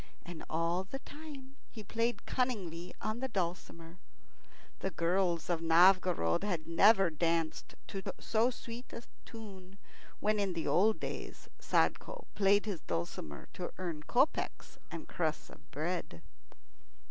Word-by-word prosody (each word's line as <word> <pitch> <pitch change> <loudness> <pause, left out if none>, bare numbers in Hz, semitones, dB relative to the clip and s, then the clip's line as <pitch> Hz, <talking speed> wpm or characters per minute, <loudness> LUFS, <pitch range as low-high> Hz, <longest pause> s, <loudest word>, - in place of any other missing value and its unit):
And 170 -2 -7
all 165 +3 +1
the 210 +8 -6
time 280 -2 -11
he 220 - -9
played 230 +4 -1
cunningly 190 -10 -1
on 215 +2 -2
the 265 - -1
dulcimer. 170 -4 -4 0.8
The 190 - -1
girls 175 -1 +1
of 170 -2 0
Novgorod 175 - +5
had 175 -6 -1
never 195 +1 +6
danced 165 0 0
to 195 - -4 0.2
so 230 +2 +2
sweet 240 0 -8
a 230 - -6 0.2
tune 195 -4 -10 0.4
when 215 0 +2
in 195 -2 +1
the 165 -2 -2
old 215 +4 +4
days - - -6
Sadko - - +1
played 200 +1 +4
his 195 -7 -3
dulcimer 85 -3 -4
to 180 - -4
earn 170 -5 -3
kopecks - - 0
and - - -7
crusts - - -2
of 75 - -16
bread. 150 - -3
185 Hz, 135 wpm, -33 LUFS, 165-220 Hz, 0.8 s, never